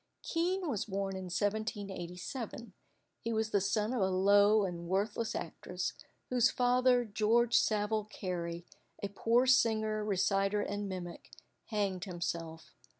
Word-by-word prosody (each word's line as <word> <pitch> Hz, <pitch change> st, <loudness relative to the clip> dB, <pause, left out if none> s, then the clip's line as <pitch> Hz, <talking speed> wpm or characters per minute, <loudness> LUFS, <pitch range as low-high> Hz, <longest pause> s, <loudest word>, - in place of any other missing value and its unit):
Kean 360 Hz, +2 st, 0 dB
was 230 Hz, -9 st, -1 dB
born 195 Hz, -1 st, -3 dB
in 190 Hz, 0 st, -5 dB
1787. 205 Hz, +2 st, -4 dB, 0.5 s
He 230 Hz, -, -2 dB
was 220 Hz, -1 st, 0 dB
the 200 Hz, -, +3 dB
son 210 Hz, +4 st, 0 dB
of 245 Hz, -, 0 dB
a 190 Hz, -, +3 dB
low 200 Hz, +2 st, +5 dB
and 170 Hz, -2 st, -5 dB
worthless 205 Hz, +5 st, -1 dB
actress, 180 Hz, +2 st, -4 dB, 0.4 s
whose 250 Hz, 0 st, +4 dB
father, 250 Hz, 0 st, +3 dB
George 225 Hz, +3 st, +2 dB
Saville 215 Hz, 0 st, +2 dB
Carey, 175 Hz, -5 st, -4 dB, 0.4 s
a 200 Hz, -, -1 dB
poor 230 Hz, +5 st, +2 dB
singer, 220 Hz, -4 st, +3 dB
reciter, 195 Hz, 0 st, +1 dB
and 205 Hz, 0 st, -3 dB
mimic, 175 Hz, -2 st, -7 dB, 0.4 s
hanged 200 Hz, -5 st, -1 dB
himself. 170 Hz, -3 st, -5 dB
205 Hz, 130 wpm, -33 LUFS, 190-225 Hz, 0.5 s, low